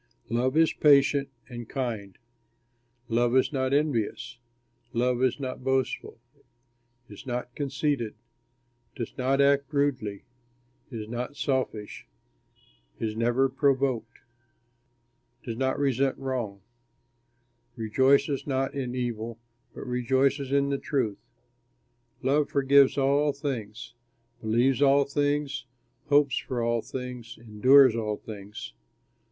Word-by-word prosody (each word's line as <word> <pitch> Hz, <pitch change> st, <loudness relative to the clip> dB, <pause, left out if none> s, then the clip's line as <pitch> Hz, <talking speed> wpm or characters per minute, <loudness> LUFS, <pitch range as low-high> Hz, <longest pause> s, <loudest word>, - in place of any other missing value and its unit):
Love 130 Hz, +5 st, +1 dB
is 160 Hz, 0 st, +4 dB
patient 140 Hz, -1 st, +4 dB, 0.2 s
and 120 Hz, -2 st, -8 dB
kind; 110 Hz, -8 st, -4 dB, 0.9 s
love 120 Hz, +2 st, +2 dB
is 130 Hz, -, +2 dB
not 130 Hz, -1 st, 0 dB
envious; 120 Hz, -5 st, -1 dB, 0.5 s
love 125 Hz, +1 st, +1 dB
is 130 Hz, 0 st, +1 dB
not 130 Hz, -2 st, -5 dB
boastful, 130 Hz, -2 st, -1 dB, 0.9 s
is 105 Hz, +4 st, -12 dB
not 125 Hz, 0 st, -4 dB
conceited, 135 Hz, -4 st, -2 dB, 0.8 s
does 115 Hz, -, -6 dB
not 135 Hz, +2 st, +1 dB
act 140 Hz, 0 st, +3 dB
rudely, 130 Hz, -9 st, -1 dB, 0.7 s
is 110 Hz, -5 st, -6 dB
not 120 Hz, +4 st, -5 dB
selfish, 130 Hz, -8 st, -3 dB, 0.9 s
is 110 Hz, -1 st, -2 dB
never 120 Hz, +4 st, +2 dB
provoked, 130 Hz, -4 st, 0 dB, 1.2 s
does 115 Hz, -, -5 dB
not 130 Hz, +2 st, 0 dB
resent 135 Hz, -1 st, +1 dB
wrong; 120 Hz, -7 st, -4 dB, 1.1 s
rejoices 135 Hz, +5 st, +2 dB
not 135 Hz, -1 st, -1 dB
in 130 Hz, -3 st, -3 dB
evil, 115 Hz, -2 st, -3 dB, 0.4 s
but -, -, -7 dB
rejoices 130 Hz, +2 st, +1 dB
in 140 Hz, 0 st, +2 dB
the 140 Hz, -1 st, -1 dB
truth. 120 Hz, -8 st, -1 dB, 1.0 s
Love 145 Hz, +3 st, +2 dB
forgives 140 Hz, 0 st, +4 dB
all 140 Hz, +2 st, +3 dB
things, 120 Hz, -4 st, -5 dB, 0.5 s
believes 120 Hz, +5 st, +2 dB
all 140 Hz, 0 st, +5 dB
things, 145 Hz, -2 st, -1 dB, 0.4 s
hopes 145 Hz, -2 st, +3 dB
for 125 Hz, -, -4 dB
all 115 Hz, 0 st, +1 dB
things, 125 Hz, -2 st, -7 dB
endures 120 Hz, +3 st, +5 dB
all 105 Hz, -2 st, -2 dB
things. 105 Hz, -, -9 dB
130 Hz, 110 wpm, -27 LUFS, 120-140 Hz, 1.2 s, all